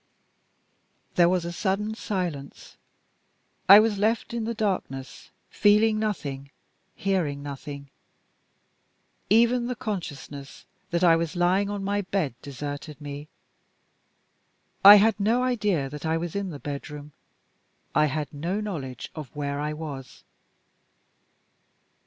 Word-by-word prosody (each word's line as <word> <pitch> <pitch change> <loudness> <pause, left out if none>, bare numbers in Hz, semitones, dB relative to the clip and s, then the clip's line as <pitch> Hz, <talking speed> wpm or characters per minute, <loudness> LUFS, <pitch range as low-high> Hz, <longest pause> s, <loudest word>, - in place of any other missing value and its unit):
There 175 -1 +5
was 180 -2 0
a 170 - -3
sudden 200 +4 -1
silence. 175 -10 -5 0.9
I 200 +2 +12
was 220 +1 +3
still 205 -1 -5
left 225 +2 0
in 235 -2 -2
the 230 +1 -3
darkness; 180 -11 -3 0.2
feeling 215 +1 +4
nothing, 140 -11 -3 0.5
hearing 165 -8 -1
nothing. 140 0 -8 1.4
Even 235 +3 +4
the 250 - -3
consciousness 145 - -6 0.2
that 170 0 0
I 170 -2 +6
was 165 +1 -2
lying 185 +3 +2
on 205 -1 -4
my 205 +1 0
bed 185 -8 -2
deserted 145 +2 -7
me. 145 0 -7 1.6
I 200 +1 +12
had 215 +1 +4
no 230 +5 +2
idea 210 - 0
that 150 -1 -8
I 160 +1 +1
was 170 +1 -5
in 200 -1 -2
the 150 - -7
bedroom; 145 +1 -7 0.8
I 150 - +4
had 150 +1 -4
no 170 +8 -2
knowledge 150 - -5
of 150 -5 -8
where 140 -1 -3
I 150 +1 -2
was. 150 -4 -8
175 Hz, 125 wpm, -26 LUFS, 145-205 Hz, 1.6 s, I